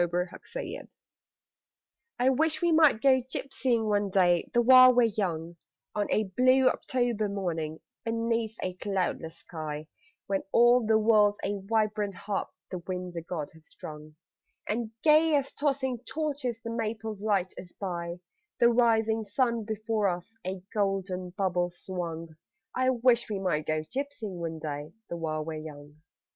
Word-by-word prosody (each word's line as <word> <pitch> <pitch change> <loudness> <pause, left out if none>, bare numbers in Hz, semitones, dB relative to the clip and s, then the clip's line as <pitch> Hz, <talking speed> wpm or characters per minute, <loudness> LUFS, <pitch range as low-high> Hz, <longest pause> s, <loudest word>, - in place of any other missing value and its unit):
THE 175 - +3 0.2
GYPSYING - - -7 1.3
I 255 +2 +3
wish 310 +3 +1
we 345 0 +2
might 310 -8 +5
go 260 -2 +5
gypsying 255 -2 -1
one 205 -1 +1
day 175 -2 +3
the 240 -1 +3
while 255 +1 +9
we're 245 - +6
young 175 -7 -1 0.4
On 205 -1 0
a 215 - +3
blue 255 +6 +4
October 240 -6 -1
morning 165 -6 -3 0.2
Beneath 230 -1 -1
a 185 - -2
cloudless 180 -4 -2
sky, 155 -3 -6 0.4
When 195 -1 0
all 240 +1 +5
the 220 0 +5
world's 210 -2 +4
a 200 0 -2
vibrant 210 -2 0
harp 200 +1 -3 0.2
The 185 - -3
winds 180 0 -5
o' 170 - -3
God 165 -3 -5
have 160 -1 -18
strung, 150 0 -10 0.5
And 225 +1 -1
gay 310 0 +5
as 275 -1 0
tossing 270 -4 -1
torches 275 -3 -3
the 230 - -4
maples 220 -2 -3
light 200 -4 +1
us 180 - -10
by; 170 -3 -3 0.4
The 235 -1 +5
rising 225 -2 +3
sun 230 +1 0
before 215 -1 -1
us 180 +5 -4
a 185 0 -5
golden 195 -3 -1
bubble 180 -2 0
swung 170 -3 -6 0.4
I 255 0 +2
wish 240 -2 +3
we 210 - -1
might 175 -6 -1
go 155 0 +1
gypsying 225 - -5
one 165 -1 -4
day 150 0 -5 0.2
the 170 - -2
while 155 -2 -2
we're 160 -1 -4
young. 150 0 -11
205 Hz, 155 wpm, -28 LUFS, 175-240 Hz, 1.3 s, while